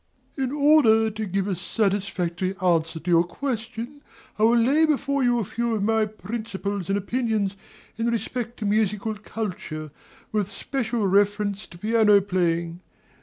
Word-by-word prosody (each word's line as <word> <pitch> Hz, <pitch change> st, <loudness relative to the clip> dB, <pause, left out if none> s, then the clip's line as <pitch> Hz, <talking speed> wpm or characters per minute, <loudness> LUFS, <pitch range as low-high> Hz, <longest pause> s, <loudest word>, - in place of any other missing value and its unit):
DOMINIE. 265 Hz, -3 st, -1 dB
In 280 Hz, -, -4 dB
order 230 Hz, -7 st, +5 dB
to 215 Hz, +1 st, -4 dB
give 195 Hz, +1 st, -1 dB
a 195 Hz, -2 st, -1 dB
satisfactory 190 Hz, -2 st, -1 dB
answer 165 Hz, -3 st, +1 dB
to 175 Hz, +3 st, -3 dB
your 170 Hz, 0 st, +6 dB
question, 235 Hz, +6 st, -5 dB, 0.4 s
I -, -, +2 dB
will 235 Hz, +1 st, +5 dB
lay 270 Hz, +7 st, +4 dB
before 280 Hz, -2 st, 0 dB
you 245 Hz, -1 st, +3 dB
a 230 Hz, -, 0 dB
few 235 Hz, +3 st, -2 dB
of 205 Hz, -, -1 dB
my 220 Hz, 0 st, +2 dB
principles 205 Hz, -2 st, -5 dB
and 195 Hz, -, +2 dB
opinions 215 Hz, -2 st, -1 dB, 0.4 s
in 230 Hz, +1 st, 0 dB
respect 235 Hz, +1 st, -2 dB
to 215 Hz, -, -4 dB
musical 210 Hz, +1 st, +1 dB
culture, 185 Hz, -8 st, -6 dB, 0.4 s
with 210 Hz, -3 st, 0 dB
special 240 Hz, -4 st, -2 dB
reference 205 Hz, +1 st, +1 dB
to 170 Hz, -, -13 dB
piano 215 Hz, +1 st, +4 dB
playing. 170 Hz, -3 st, -1 dB
210 Hz, 155 wpm, -24 LUFS, 190-235 Hz, 0.4 s, your